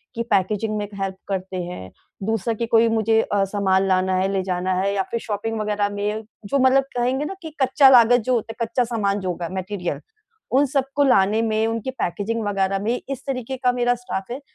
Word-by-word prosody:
कि 230 Hz, -, -1 dB
पैकेज़िग 210 Hz, +3 st, +1 dB
में 205 Hz, -1 st, -3 dB
हेल्प 195 Hz, -1 st, -2 dB
करते 190 Hz, -1 st, -3 dB
हैं। 175 Hz, -, -7 dB, 0.3 s
दूसरा 225 Hz, +2 st, -1 dB
कि 230 Hz, +2 st, -2 dB
कोई 230 Hz, 0 st, +4 dB
मुझे 225 Hz, 0 st, +2 dB
अ, 200 Hz, -2 st, 0 dB
सामान 195 Hz, -1 st, +1 dB
लाना 185 Hz, 0 st, +2 dB
है, 185 Hz, +1 st, +1 dB
ले 195 Hz, -, +1 dB
जाना 185 Hz, 0 st, -1 dB
है 200 Hz, +1 st, 0 dB
या 195 Hz, -, 0 dB
फिर 235 Hz, -, -1 dB
शॉपिंग 225 Hz, +1 st, -3 dB
वग़ैरह 210 Hz, -1 st, 0 dB
में 205 Hz, +2 st, -3 dB, 0.2 s
जो 275 Hz, +8 st, 0 dB
मतलब 260 Hz, +1 st, +5 dB
कहेंगे 255 Hz, +4 st, 0 dB
ना 345 Hz, -, -4 dB
कि 320 Hz, -2 st, -7 dB
कच्चा 265 Hz, +1 st, +6 dB
लागत 245 Hz, -1 st, +6 dB
जो -, -, +4 dB
होता 225 Hz, -1 st, -1 dB
है, -, -, +2 dB
कच्चा 235 Hz, +3 st, 0 dB
सामान 210 Hz, -4 st, -1 dB
जो 185 Hz, -2 st, -3 dB
होगा 175 Hz, -1 st, -4 dB
मटेरियल, 185 Hz, -1 st, -3 dB, 0.5 s
उन 275 Hz, +3 st, +4 dB
सबको 275 Hz, +1 st, 0 dB
लाने 215 Hz, -4 st, +3 dB
में, 220 Hz, -1 st, +1 dB
उनकी 230 Hz, +3 st, -3 dB
पैकेज़िग 225 Hz, 0 st, -2 dB
वग़ैरह 195 Hz, -1 st, 0 dB
में 235 Hz, +4 st, 0 dB
इस 275 Hz, -3 st, -5 dB
तरीके 260 Hz, -1 st, -3 dB
का 250 Hz, -1 st, +2 dB
मेरा 245 Hz, 0 st, +1 dB
स्टाफ़ 235 Hz, -4 st, -5 dB
है 270 Hz, -, -7 dB
220 Hz, 210 wpm, -22 LUFS, 195-245 Hz, 0.5 s, कच्चा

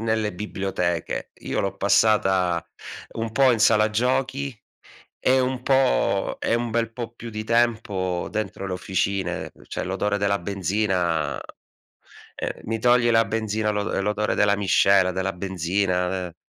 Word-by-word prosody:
nelle 110 Hz, -2 st, 0 dB
biblioteche. 90 Hz, -3 st, -3 dB
Io -, -, -1 dB
l'ho 100 Hz, -, -2 dB
passata 95 Hz, -4 st, +2 dB, 0.5 s
un 115 Hz, -1 st, -4 dB
po' 130 Hz, +1 st, +5 dB
in 115 Hz, -, 0 dB
sala 110 Hz, 0 st, +5 dB
giochi 130 Hz, +3 st, 0 dB, 0.6 s
e 130 Hz, +1 st, +3 dB
un 130 Hz, 0 st, -1 dB
po' 130 Hz, -7 st, +2 dB
e -, -, +1 dB
un 120 Hz, 0 st, -1 dB
bel 115 Hz, 0 st, -1 dB
po' 120 Hz, 0 st, -6 dB
più 115 Hz, 0 st, -9 dB
di 110 Hz, 0 st, -5 dB
tempo 110 Hz, -6 st, 0 dB
dentro 110 Hz, -2 st, -4 dB
le 95 Hz, -, -4 dB
officine, 95 Hz, 0 st, -2 dB
uhm, -, -, -18 dB
cioè -, -, -4 dB
l'odore 100 Hz, +2 st, -1 dB
della 100 Hz, 0 st, +1 dB
benzina 90 Hz, -5 st, 0 dB
uhm, -, -, -6 dB, 1.2 s
mi 115 Hz, +1 st, -2 dB
togli 120 Hz, +1 st, +4 dB
la 115 Hz, 0 st, +4 dB
benzina, 110 Hz, 0 st, -1 dB
l'odo 105 Hz, -1 st, -2 dB
ehm, 100 Hz, -, 0 dB
l'odore 105 Hz, +1 st, 0 dB
della 100 Hz, -1 st, +3 dB
miscela, 95 Hz, -1 st, +4 dB
della 95 Hz, +1 st, -1 dB
benzina, 90 Hz, 0 st, -1 dB
de 90 Hz, -2 st, -4 dB
105 Hz, 150 wpm, -24 LUFS, 95-115 Hz, 1.2 s, po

